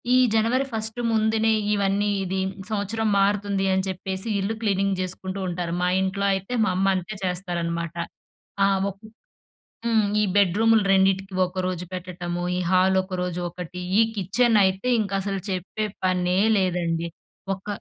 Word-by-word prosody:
ఈ - - +6 0.2
జనవరి 235 +5 +2
ఫస్ట్ 220 +1 -4
ముందునే 220 0 +2 0.2
ఇవన్నీ 200 0 +1
ఇది 190 +1 -2 0.3
సంవత్సరం 220 +1 -1
మారుతుంది 200 -1 +1
అని 190 - +1
చెప్పేసి 190 +2 -4
ఇల్లు 195 +3 -1
క్లీనింగ్ 195 -2 +1
జేసుకుంటూ 185 +1 -4
ఉంటారు. 175 -1 -3
మా 180 - +2
ఇంట్లో 190 +1 -1
అయితే 195 +5 -3
మా 190 - +1
అమ్మంతే 190 +1 0
చేస్తారనమాట. 170 -2 -2 0.7
ఆ! - - +4 0.2
ఒకొక్ 205 +3 -12 0.8
హ్మ్. 220 -2 +3 0.2
ఈ - - +3
బెడ్ 195 -3 +4
రూములు 225 -1 +5
2కి 190 0 +2
ఒకరోజు 185 -1 -3
పెట్టటము. 175 -1 -4
ఈ - - 0
హాలొకరోజు 185 -1 +1
ఒకటి. 180 +1 -7 0.2
ఈ - - +7 0.2
కిచెనయితే 200 0 +2
ఇంకసలు 195 -1 -2
చెప్పే 190 +4 -3 0.2
పనే 180 0 +1 0.2
లేదండి! 170 -3 0 0.5
ఒక 190 - -17
190 Hz, 130 wpm, -24 LUFS, 180-205 Hz, 0.8 s, ఈ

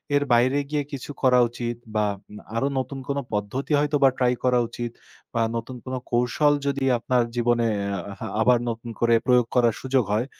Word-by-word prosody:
এর 145 - +3
বাইরে 125 +4 +4
গিয়ে 150 -1 0
কিছু 140 0 -6
করা 125 -1 +5
উচিত 120 0 -4 0.2
বা 105 - +2 0.5
আরো 135 +4 +1
নতুন 135 +1 -4
কোনো 140 -1 -1
পদ্ধতি 105 +8 -3
হয়তোবা 145 -2 +3
ট্রাই 125 -1 +2
করা 125 -1 +3
উচিত 120 0 -5 0.4
বা 115 - +1
নতুন 115 +3 -5
কোনো 130 0 -3
কৌশল 125 +5 +3
যদি 140 -1 -1
আপনার 120 +1 +1
জীবনে 120 -1 +2 0.3
আ - - -3 0.4
আবার 125 +2 +5
নতুন 115 +1 -5
করে 120 0 +3
প্রয়োগ 125 -2 +4
করার 120 -3 +4
সুযোগ 130 -2 +1
হয়, 110 +4 +1
125 Hz, 175 wpm, -24 LUFS, 120-135 Hz, 0.5 s, করা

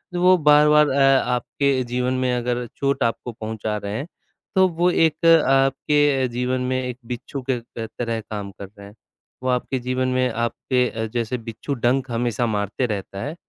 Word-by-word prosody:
वो 180 +1 +5
बार-बार 150 0 +5
अ, 135 -1 +4
आपके 130 +2 0
जीवन 125 +1 -1
में 125 -1 +1
अगर 120 0 -2
चोट 140 -1 0
आपको 115 +1 -2
पहुँचा 110 -1 -4
रहे 100 +1 -4
हैं, 145 - -5 0.5
तो 190 0 +5
वो 175 0 +1
एक 165 0 +1 0.2
आपके 135 0 +2
जीवन 125 +1 -2
में 130 0 0
एक 125 -1 -5
बिच्छू 125 +3 -5
के 125 -2 +1
त 115 -1 -8
तरह 115 -2 -1
काम 105 -1 -6
कर 100 +1 -9
रहे 100 0 -11
हैं, 105 - -15 0.5
वो 130 - 0
आपके 125 +1 0
जीवन 130 +1 -1
में 130 0 +1
आपके 120 +2 0
अ, 110 0 -4
जैसे 120 +1 -1
बिच्छू 115 +4 -6
डंक 130 +1 0
हमेशा 120 0 0
मारते 105 +3 -1
रहता 100 -2 -4
है 150 +4 -5
125 Hz, 180 wpm, -22 LUFS, 115-135 Hz, 0.5 s, वो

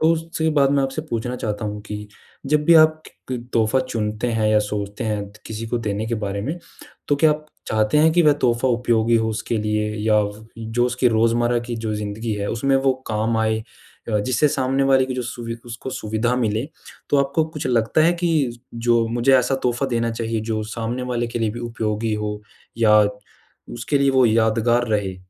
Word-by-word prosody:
तो 160 +1 +4
उसके 165 0 -2
बाद 140 -2 +4
मैं 140 -1 +2
आपसे 135 +3 -3
पूछना 120 +2 -2
चाहता 105 -1 -3
हूँ 105 0 -4
कि 105 -1 -7 0.4
जब 150 +1 +2
भी 170 - +6
आप 155 0 +5 0.3
क 125 - -1
तोहफ़ा 110 +3 +2
चुनते 110 -2 -3
हैं 110 -1 +1
या 110 0 +4
सोचते 105 +2 -3
हैं 105 -2 -1 0.2
किसी 110 +1 -5
को 120 +1 -1
देने 105 -1 -2
के 115 - -1
बारे 100 -2 -3
में। 155 +9 -3 0.5
तो 145 - +3
क्या 155 +1 +4
आप 150 0 -2 0.2
चाहते 110 +6 +2
हैं 160 +1 +5
कि 175 0 +4
वह 150 - +6
तोहफ़ा 120 +1 +2
उपयोगी 115 -1 +2
हो 110 0 +1
उसके 110 +1 -2
लिए 105 0 0 0.2
या 105 -1 +4 0.4
जो 115 +2 -1
उसकी 125 0 +2
रोज़मर्रा 120 +1 +2
की 120 - -4
जो 110 -1 -3
ज़िंदगी 105 +2 -4
है 100 0 -3
उसमें 135 +4 +1
वो 135 0 +2
काम 110 +1 0
आए। 110 0 +1 0.5
अ, 105 -2 +1
जिससे 130 +6 +2
सामने 135 0 0
वाले 135 -1 +4
की 130 - -4
जो 125 - -2
सुवि 115 -1 -5
उसको 120 +2 -7
सुविधा 120 -1 -1
मिले, 110 +1 0 0.4
तो 145 - +4
आपको 140 +4 0
कुछ 150 -4 -5
लगता 120 +3 +2
है 170 - +4
कि 160 -9 0 0.2
जो 115 0 +2
मुझे 120 +3 +3
ऐसा 125 +2 +1
तोहफ़ा 125 +2 0
देना 115 -2 0
चाहिए 115 -1 -2
जो 110 -1 -1
सामने 120 +2 -3
वाले 120 0 -1
के 120 - -4
लिए 110 -2 0
भी 120 +3 -7
उपयोगी 110 -2 -2
हो 105 0 -3 0.4
या 105 -2 +6 0.8
उसके 140 +4 -1
लिए 140 0 +3
वो 130 -2 +4
यादगार 115 +2 +2
रहे? 100 -4 -1
115 Hz, 200 wpm, -21 LUFS, 110-130 Hz, 0.8 s, भी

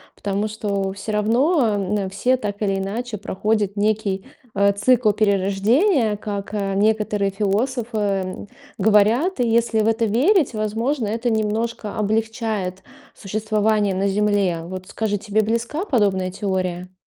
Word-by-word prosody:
потому 200 +1 -2
что 200 -3 -2
всё 200 +2 -6
равно, 230 - +2
м, 200 0 -1
все, 255 +6 +1
так 205 -3 -5
или 195 -2 +1
иначе, 215 +3 -4
проходят 205 0 -1
некий, 205 -2 0 0.3
э, 200 0 +4
цикл 225 +1 +3
перерождения, 210 - +2
как, 205 -1 -5
э, 195 -2 -1
некоторые 210 -1 +1
философы, 220 +4 -1
м, 195 -1 -2 0.3
говорят. 220 - +3
И 240 - +2
если 230 -1 +2
в 215 - +1
это 225 0 +1
верить, 275 - +3
возможно, 220 +4 -1
это 230 +3 -1
немножко 220 0 -2
облегчает 215 -3 -1 0.3
существование 210 -1 0
на 195 +1 0
Земле. 200 -4 +1
Вот 185 +1 -7
скажи, 210 -1 -2
тебе 215 +1 0
близка 235 - -2
подобная 195 - +1
теория? 185 -2 -3
210 Hz, 135 wpm, -21 LUFS, 200-225 Hz, 0.3 s, э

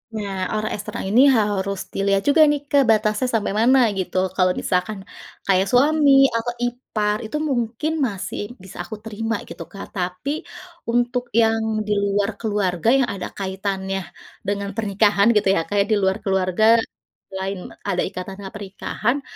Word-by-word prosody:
Nah, 195 -3 -3
orang 215 0 -2
eksternal 205 -1 -5
ini 215 +6 +4
h 260 - +4
harus 200 -2 -1
dilihat 195 0 +1
juga 315 +3 +5
nih 295 0 +1
Kak 285 -1 +5
batasnya 215 +2 +2
sampai 215 -3 0
mana, 260 +3 +5 0.2
gitu. 185 0 -3 0.2
Kalau 185 -1 +3
misalkan 190 +3 -1 0.5
kayak 190 0 +3
suami 290 +4 +4 0.2
atau 230 +1 -1
ipar, 215 -4 -1
itu 260 +8 -3
mungkin 240 +4 -1 0.2
masih 195 -4 -5 0.2
bisa 190 - -12
aku 215 +5 -7
terima, 225 +1 -2
gitu, - - -7
Kak. 195 - -7
Tapi 180 +7 -3 0.6
untuk 245 +1 +1 0.2
yang 225 0 +2 0.3
di 210 - +1
luar 200 0 +1
keluarga 205 -3 0
yang 265 - +3
ada 190 -2 -5
kaitannya 195 0 -3 0.5
dengan 200 0 -1
pernikahan 205 -1 +3
gitu 200 - +1
ya, - - +2
kayak 200 -1 +2
di - - +5
luar 190 0 +2
keluarga 190 0 +1 0.7
selain 190 0 -4 0.3
ada 195 -3 0
ikatan 190 0 -7
ha 195 - -6
pernikahan, 210 +6 -3
205 Hz, 155 wpm, -22 LUFS, 195-225 Hz, 0.7 s, juga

